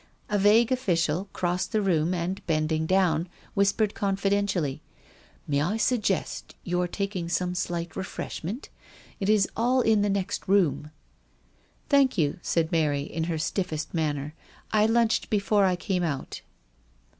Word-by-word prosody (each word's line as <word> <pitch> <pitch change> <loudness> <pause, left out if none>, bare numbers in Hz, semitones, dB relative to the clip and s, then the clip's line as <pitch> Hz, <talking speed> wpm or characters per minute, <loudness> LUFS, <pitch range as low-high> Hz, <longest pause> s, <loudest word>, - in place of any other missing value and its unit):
A 205 -1 +1
vague 220 +5 +5
official 185 -7 0
crossed 180 0 -1
the 215 -2 +1
room 170 -3 +2
and, 180 +2 -2
bending 155 0 0
down, 180 -2 +2 0.2
whis 200 0 +3
pered 215 -1 0
confidentially: 195 -6 0 0.7
"May 140 -1 +1
I 190 +9 0
suggest 215 -5 -1
your 180 0 0
taking 190 -2 -3
some 180 +1 0
slight 175 -1 -3
refreshment? 190 - -5 0.5
It 195 - -1
is 210 -2 +4
all 250 +3 +2
in 220 -3 +3
the 205 - +1
next 195 -2 -2
room." 180 -6 +2 1.0
"Thank 280 -5 +3
you," 155 +2 +1
said 165 -1 0
Mary, 150 -4 +1
in 160 +2 -3
her 165 -1 -2
stiffest 155 0 -2
manner. 150 -3 -1 0.2
" - - -27
I 215 0 +4
lunched 230 0 +2
before 205 -1 +2
I 185 -1 +2
came 180 0 -2
out." 155 -6 -3
185 Hz, 145 wpm, -26 LUFS, 165-205 Hz, 1.0 s, vague